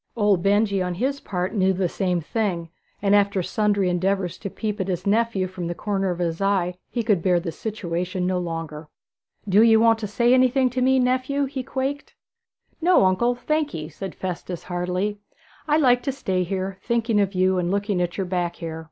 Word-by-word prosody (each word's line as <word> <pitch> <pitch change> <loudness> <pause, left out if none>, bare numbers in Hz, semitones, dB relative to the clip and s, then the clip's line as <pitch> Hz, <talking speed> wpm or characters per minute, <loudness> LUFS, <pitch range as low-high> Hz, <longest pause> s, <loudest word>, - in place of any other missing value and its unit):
Old 205 -5 +2
Benjy 200 0 +2
on 180 -1 -2
his 270 +8 -1
part 185 -3 -3
knew 190 -3 +2
the 185 0 0
same 180 -1 -1
thing, 175 -2 -2 0.3
and 200 0 +3
after 200 -2 +3
sundry 205 -1 +1
endeavours 185 0 0
to 200 - -5
peep 210 +1 -3
at 190 - -2
his 180 -1 -3
nephew 215 -2 +1
from 180 -2 -5
the 175 - -3
corner 195 0 -1
of 175 - -2
his 170 0 -2
eye, 195 -3 +1 0.2
he 235 - -2
could 210 -6 +2
bear 180 0 +3
the 170 -1 -4
situation 180 -2 -3
no 185 0 0
longer. 165 -3 -5 0.6
'Do 200 +2 +5
ye 225 -1 +6
want 225 0 +4
to 215 - -3
say 235 +4 +2
anything 255 0 +3
to 255 +1 -2
me, 265 +1 +4
nephew?' 255 +2 +1
he 270 0 -4
quaked. 270 +3 -4 0.7
'No, 350 - +5
uncle, 235 +7 +2
thank 305 +4 -1
ye,' 155 -1 -5
said 185 +3 -7
Festus 180 -1 -5
heartily. 180 +3 -2 0.5
'I 300 0 +3
like 250 -5 +4
to 275 - -1
stay 190 -9 -1
here, 190 +1 -3
thinking 230 -2 +1
of 195 -1 -1
you 185 0 +2
and 175 -1 -1
looking 200 -1 0
at 175 -1 -2
your 195 - -1
back 175 -1 -2
hair.' 160 -1 -6
195 Hz, 200 wpm, -23 LUFS, 180-230 Hz, 0.7 s, ye